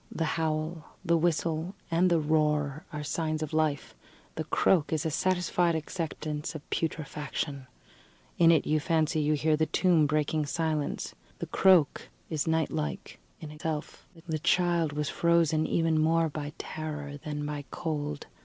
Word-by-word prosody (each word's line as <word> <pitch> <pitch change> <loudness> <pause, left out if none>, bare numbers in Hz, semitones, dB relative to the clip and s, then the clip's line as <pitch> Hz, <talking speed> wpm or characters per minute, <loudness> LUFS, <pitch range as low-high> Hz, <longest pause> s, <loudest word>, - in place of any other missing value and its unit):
The 165 - -1
howl, 160 0 -2
the 170 -1 +3
whistle 165 +1 0 0.2
and 175 +2 +4
the 170 - +4
roar, 150 -1 +1
are 150 -1 -5
signs 155 +1 -1
of 155 - -6
life; 155 -3 0 0.4
the - - -4
croak 165 -6 +2
is 160 0 0
a 160 - 0
satisfied 175 0 +1
acceptance 155 -1 -4
of 150 - -8
putrefaction. 150 -3 -3 0.7
In 165 -1 +7
it 160 -3 +3
you 155 0 +2
can 150 - -11
fancy 160 -1 +2
you 150 +1 +2
hear 155 +1 +2
the 155 +1 +1
tomb 170 -5 +3
breaking 150 0 0
silence. 155 -1 -2 0.2
The - - -4
croak 185 -6 +3 0.2
is 155 0 -1
night 160 -1 +1
like 75 -3 -4 0.2
in 155 -2 -7
itself. 150 0 -5 0.2
The 160 -2 -1
child 170 -1 +2
was 150 0 -2
frozen 165 -2 +2
even 165 -1 +2
more 165 +1 +3
by 145 0 -5
terror 150 -2 -5
than 150 0 -5
by 145 -1 -4
cold. 150 -2 -3
155 Hz, 155 wpm, -29 LUFS, 150-165 Hz, 0.7 s, In